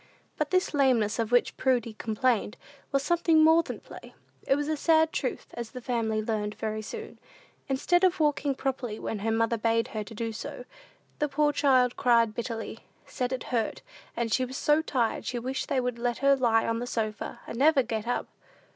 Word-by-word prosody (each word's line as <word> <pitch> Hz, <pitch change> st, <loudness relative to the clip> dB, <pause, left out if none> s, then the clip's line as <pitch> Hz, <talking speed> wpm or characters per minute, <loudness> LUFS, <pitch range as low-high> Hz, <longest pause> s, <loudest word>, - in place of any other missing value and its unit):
But 305 Hz, -1 st, -1 dB
this 370 Hz, -2 st, +1 dB
lameness 250 Hz, -7 st, +2 dB
of 225 Hz, 0 st, -1 dB
which 245 Hz, 0 st, +4 dB
little -, -, -20 dB
Prudy 235 Hz, -2 st, -2 dB
complained, 220 Hz, 0 st, 0 dB, 0.3 s
was 275 Hz, 0 st, +1 dB
something 330 Hz, -2 st, +3 dB
more 320 Hz, +1 st, +6 dB
than -, -, -7 dB
play; -, -, -12 dB, 0.3 s
it 270 Hz, -, +4 dB
was 290 Hz, +1 st, -2 dB
a 310 Hz, -, 0 dB
sad 320 Hz, +1 st, +3 dB
truth, -, -, -3 dB
as 235 Hz, -2 st, -5 dB
the 255 Hz, -, -8 dB
family 225 Hz, -3 st, -1 dB
learned 210 Hz, -1 st, -2 dB
very 215 Hz, -1 st, -3 dB
soon. 445 Hz, -, -8 dB, 0.5 s
Instead 350 Hz, +7 st, +2 dB
of 370 Hz, -1 st, +3 dB
walking 295 Hz, -2 st, +1 dB
properly 255 Hz, -5 st, -3 dB
when 220 Hz, -, -4 dB
her 220 Hz, +3 st, -1 dB
mother 230 Hz, +1 st, +1 dB
bade 230 Hz, +1 st, +1 dB
her 215 Hz, -1 st, -4 dB
do 225 Hz, +2 st, -5 dB
so, 235 Hz, +3 st, -7 dB, 0.5 s
the 295 Hz, -, 0 dB
poor 295 Hz, +1 st, +2 dB
child 255 Hz, -4 st, +3 dB
cried 235 Hz, -4 st, +3 dB
bitterly, 225 Hz, -1 st, -5 dB, 0.3 s
said 250 Hz, 0 st, -3 dB
it 260 Hz, -2 st, -3 dB
hurt 225 Hz, -3 st, -1 dB
her, -, -, -37 dB, 0.3 s
and 230 Hz, -2 st, -1 dB
she 255 Hz, -, +2 dB
was 260 Hz, +1 st, -5 dB
so 300 Hz, +1 st, +3 dB
tired 250 Hz, -7 st, -1 dB
she 250 Hz, -, -3 dB
wished 260 Hz, +3 st, -3 dB
they 275 Hz, -, +2 dB
would 245 Hz, -2 st, -2 dB
let 240 Hz, 0 st, -1 dB
her 275 Hz, 0 st, +4 dB
lie 230 Hz, -4 st, +2 dB
on 230 Hz, 0 st, 0 dB
the 245 Hz, -, -4 dB
sofa, 215 Hz, -3 st, -3 dB
and 230 Hz, -, -6 dB
never 285 Hz, -1 st, +5 dB
get 225 Hz, -1 st, -4 dB
up. 245 Hz, -, -1 dB
245 Hz, 200 wpm, -28 LUFS, 225-280 Hz, 0.5 s, more